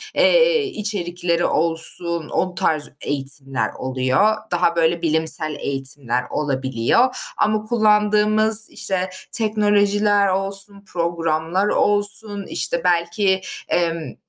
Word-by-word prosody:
eee, - - +4
içerikleri 180 - -2
olsun, 165 0 +1
o 185 -1 -2
tarz 155 -3 0
eğitimler 135 -1 -2
oluyor. 130 +11 0 0.2
Daha, 175 -1 +1
böyle, 165 0 +1
bilimsel 160 -1 -1
eğitimler 135 -3 -2
olabiliyor. 135 - 0 0.2
Ama 215 0 +1
kullandığımız, 215 0 +2
işte, 185 -1 -2 0.2
teknolojiler 210 -1 +1
olsun, 195 +1 +1
programlar 170 +2 -1
olsun, 205 0 0
işte, 170 - 0
belki, 180 +2 +1 0.3
emm, 165 -2 -2
180 Hz, 90 wpm, -20 LUFS, 160-210 Hz, 0.3 s, eee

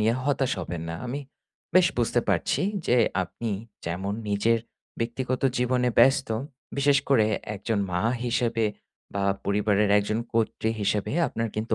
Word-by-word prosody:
নিয়ে 110 +2 +3
হতাশ 135 -2 +1
হবেন 85 -2 -5
না। 85 - -3
আমি 135 +4 -3 0.5
বেশ 185 -1 +7
বুঝতে 120 0 +2
পারছি 95 - +1 0.2
যে 125 - +4 0.3
আপনি 110 +5 -5 0.4
যেমন 95 +4 -2 0.2
নিজের 105 +3 +2 0.4
ব্যক্তিগত 125 +2 -2 0.2
জীবনে 125 0 +2
ব্যস্ত, 135 0 +5 0.5
বিশেষ 140 0 +4
করে 115 -6 +5 0.3
একজন 105 +2 -1
মা 90 - 0 0.2
হিসেবে, 115 -1 +1 0.5
বা 100 -1 0 0.2
পরিবারের 105 0 +2
একজন 105 +2 -1 0.2
কর্ত্রী 110 0 +1
হিসেবে 105 0 0
আপনার 115 0 -2
কিন্তু 110 +1 0
115 Hz, 140 wpm, -26 LUFS, 100-125 Hz, 0.5 s, বেশ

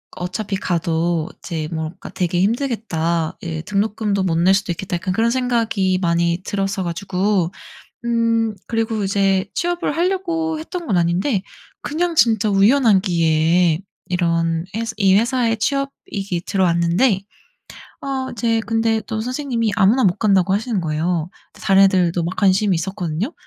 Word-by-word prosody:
어차피 190 +3 -3
가도 170 -2 -1
이제 160 -4 -4
뭐랄까 160 +1 -5
'되게 175 -1 0
힘들겠다.' 190 - -1
예, 160 -2 -4
'등록금도 205 -1 -1
못 170 -3 0
낼 185 +3 +4
수도 200 -2 -1
있겠다.' 180 +1 -4
약간 180 +1 -2
그런 225 +3 +2
생각이 230 -7 +1
많이 170 0 +1
들었어 195 -1 -2
가지고 185 +1 -1 0.5
음 230 -2 +1
그리고 225 -2 -1
이제 195 -1 +1
취업을 345 -3 -1
하려고 335 -3 -1
했던 340 +2 -6
건 200 - +1
아닌데 185 +5 +1 0.4
그냥 340 +3 -1
진짜 220 -4 +3
우연한 210 +1 +4
기회에 165 -2 +2 0.3
이런 165 -2 0
회사 225 0 -2
이 195 -2 +4
회사에 230 0 +1
취업이기 215 -8 -3
들어왔는데 185 +3 +2 0.8
아 265 -1 -3
이제 230 -1 0
근데 225 -1 0
또 220 0 -2
선생님이 245 -2 -1
아무나 225 +7 +4
못 180 -3 +2
간다고 195 -3 +3
하시는 215 -2 -1
거예요. 160 +2 -1 0.2
근데 - - -13
다른 195 0 +6
애들도 180 -3 +2
막 175 +3 -3
관심이 195 -1 +3
있었거든요. 180 - -3
195 Hz, 325 characters per minute, -20 LUFS, 175-230 Hz, 0.8 s, 다른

